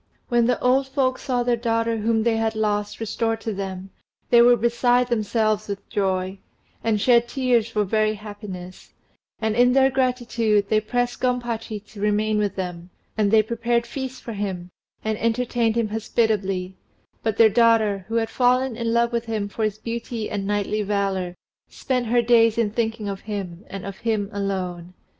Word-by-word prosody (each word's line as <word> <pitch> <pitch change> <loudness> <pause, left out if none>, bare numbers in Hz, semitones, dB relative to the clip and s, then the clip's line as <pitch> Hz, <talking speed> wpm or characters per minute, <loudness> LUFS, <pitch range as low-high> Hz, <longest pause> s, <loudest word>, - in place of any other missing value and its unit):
When 240 -1 +3
the 250 - +1
old 260 +2 +3
folks 265 -1 0
saw 250 -3 0
their 240 0 +2
daughter 230 -1 0
whom 225 +1 +1
they 230 -1 +2
had 225 0 0
lost 210 -1 -1
restored 225 0 -1
to 220 - -3
them, 190 -1 -6 0.4
they 235 - +8
were 240 0 +6
beside 245 +2 +2
themselves 215 -2 0
with 200 -1 -6
joy, 190 -1 -1 0.4
and 220 -2 +1
shed 240 +1 +4
tears 245 -4 +1
for 210 -2 0
very 215 +2 +1
happiness; 205 -3 -9 0.5
and, 220 -1 0
in 245 +1 +5
their 270 0 +4
gratitude, 240 -5 +1
they 215 -1 +3
pressed 245 +2 -2
Gompachi 235 -4 -2
to 210 -1 -12
remain 210 +1 +1
with 205 -2 -1
them, 180 -2 -5 0.3
and 210 -2 +2
they 220 +1 +5
prepared 235 +1 0
feasts 260 +1 -6
for 230 - -7
him, 190 -4 -4 0.3
and 220 -1 -1
entertained 230 -1 0
him 230 -2 0
hospitably: 200 -4 -1 0.4
but 220 -1 -1
their 225 - +8
daughter, 220 -3 +3
who 225 - -4
had 225 -1 0
fallen 255 0 +2
in 230 0 -2
love 235 0 +2
with 235 0 -1
him 220 -3 -2
for 220 +2 -4
his 215 -1 -1
beauty 230 0 -5
and 195 -1 -3
knightly 205 +1 0
valour, 195 -3 -1 0.3
spent 250 -3 -2
her 240 +1 +3
days 230 -1 +4
in 225 -3 +1
thinking 225 -1 -2
of 195 -1 -4
him, 195 -4 -6
and 195 -1 -7
of 195 -1 -7
him 215 -3 -1
alone. 185 -3 -3
220 Hz, 175 wpm, -23 LUFS, 205-235 Hz, 0.5 s, they